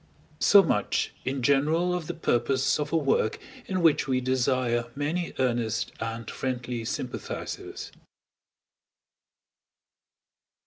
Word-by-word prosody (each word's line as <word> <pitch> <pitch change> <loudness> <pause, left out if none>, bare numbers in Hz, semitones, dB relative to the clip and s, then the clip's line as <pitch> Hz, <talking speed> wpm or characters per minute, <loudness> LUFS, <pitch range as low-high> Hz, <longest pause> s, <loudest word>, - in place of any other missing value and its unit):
So - - +7
much - - 0
in 130 -1 -2
general 155 +7 +3
of 175 -3 -3
the - - -4
purpose 130 -1 +1
of 150 0 -2
a 165 - +3
work 135 -7 +1 0.3
in 185 -2 -1
which 160 -3 +4
we 130 -1 +2
desire 125 -2 +1
many 160 +5 -2
earnest 120 -4 0
and 115 0 -4
friendly 125 -2 -3
sympathizers. 125 +2 -5
130 Hz, 105 wpm, -27 LUFS, 120-150 Hz, 0.3 s, So